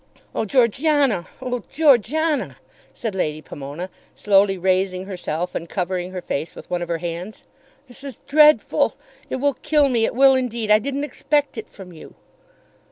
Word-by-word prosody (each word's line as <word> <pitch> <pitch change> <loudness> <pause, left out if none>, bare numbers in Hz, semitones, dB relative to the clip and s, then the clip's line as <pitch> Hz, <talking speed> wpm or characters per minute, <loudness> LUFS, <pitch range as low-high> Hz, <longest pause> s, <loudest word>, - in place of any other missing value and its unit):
"Oh, - - -1
Georgiana; 255 - +2 0.2
oh, 250 -1 -3
Georgiana!" 300 +2 +2 0.4
said 225 -4 -5
Lady 155 -5 -2
Pomona, 150 +4 -8 0.2
slowly 195 -1 +3
raising 185 0 0
herself 180 -2 -4
and 165 - -5
covering 180 -1 -2
her 185 -1 -6
face 155 +4 -4
with - - -11
one 175 -1 -1
of 175 - -3
her 170 -1 -1
hands. 175 +5 -6 0.4
"This 255 0 -14
is 275 -3 -8
dreadful. 300 +1 +4 0.3
It - - -2
will 280 +2 +1
kill 295 +1 +2
me. 230 -3 +2
It - - -3
will 270 +1 +6
indeed. 235 -4 -1
I 210 - +7
didn't 280 +4 -3
expect 290 0 -1
it 220 - -7
from 185 -3 -12
you." 160 - -13
215 Hz, 165 wpm, -21 LUFS, 180-275 Hz, 0.4 s, I